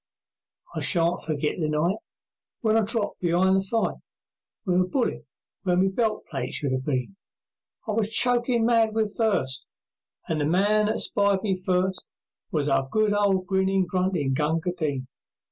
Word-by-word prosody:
I - - -3
shan't 170 -2 +2
forget 155 +1 -2
the 155 -2 0
night 155 +5 +1 0.6
When 220 -2 +2
I - - +5
dropped 220 -1 -1
be'ind 180 +2 +2
the - - +2
fight 225 +4 -1 0.7
With 180 -1 +2
a 180 - 0
bullet 250 +5 -2 0.3
where 180 -2 +1
my 190 +1 +3
belt 220 +2 -1
plate 135 -4 -4
should 140 -3 0
have 130 0 -1
been. 140 +6 -2 0.7
I - - -1
was 215 0 0
chokin' 240 0 +2
mad 225 -2 +3
with 215 -2 0
thirst, 185 - 0 0.6
And 155 -2 -1
the - - +1
man 205 +6 +2
that 215 - 0
spied 200 -1 +1
me 200 -3 +1
first 185 0 -2 0.3
Was 150 -3 -1
our 135 -1 +1
good 215 +2 +2
ol' 200 -2 +2
grinnin', 190 0 +1
gruntin' 180 -6 0
Gunga 160 +5 0
Din. 145 -7 -3
190 Hz, 160 wpm, -25 LUFS, 160-215 Hz, 0.7 s, I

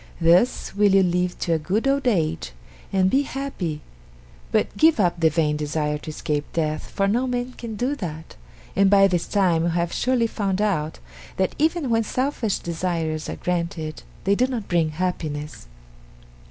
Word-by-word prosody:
Thus 175 +8 +3
will 205 -1 +4
you 195 - +6
live 180 0 0
to 170 - +1
a 160 - +1
good 195 - 0
old 275 -1 +1
age 155 - 0 0.4
and 190 -1 +3
be 265 +9 +3
happy, 260 - -4 0.7
but - - +1
give 315 -4 +4
up 175 -3 +2
the 165 -1 +4
vain 150 -1 +1
desire 150 0 -1
to 155 - -8
escape 150 -1 -3
death, 155 -2 -2
for 195 - 0
no 240 +6 +1
man 250 0 -2
can 230 -3 -7
do 250 +7 -1
that, 160 - -7 0.4
and 195 0 +4
by 195 0 +6
this 180 -3 +1
time 180 -5 +2
you 170 - +1
have 170 0 -1
surely 250 -2 +1
found 200 -4 -1
out 175 -8 0 0.4
that 190 -1 +1
even 315 -3 +1
when 225 0 +3
selfish 250 -3 -1
desires 165 -2 -2
are - - -3
granted 170 -3 -3 0.2
they 195 - +3
do 250 +5 +2
not 240 -6 -4
bring 170 -3 +2
happiness. 155 - -4
180 Hz, 175 wpm, -23 LUFS, 160-225 Hz, 0.7 s, you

